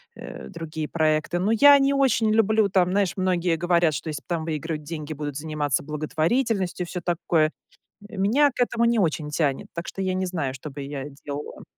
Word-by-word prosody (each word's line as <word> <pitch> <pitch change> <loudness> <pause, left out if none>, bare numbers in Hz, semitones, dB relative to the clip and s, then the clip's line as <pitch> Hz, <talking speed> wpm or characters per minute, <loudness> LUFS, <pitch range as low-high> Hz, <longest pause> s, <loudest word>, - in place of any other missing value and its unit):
э, - - -9
другие 160 -3 -5
проекты. 155 +1 0
Но 200 +4 +1
я 285 +5 +8
не 275 +1 +3
очень 245 -5 +2
люблю, 220 -1 +3
там, 180 -1 +2
знаешь, 195 -2 +1
многие 180 -2 +1
говорят, 170 -1 +2
что 155 - -4
если, 150 -2 -5
там, 165 -3 -2
выигрывают 155 -1 -3
деньги, 155 0 -6
будут 145 -1 -5
заниматься 150 -3 -1
благотворительностью 175 - -1
и - - -13
всё 180 - -4
такое. 165 -2 +1 0.6
Меня 225 +9 +3
к - - -14
этому 235 -1 +2
не 235 -1 +3
очень 155 -4 0
тянет. 145 -3 -1
Так 170 0 -5
что, 195 - -5
я 185 -1 0
не 185 0 -1
знаю, 160 -8 -2
что 135 +3 -8
бы 140 +1 -7
я 140 0 -5 0.2
делала. 145 0 -6
170 Hz, 195 wpm, -24 LUFS, 155-200 Hz, 0.6 s, я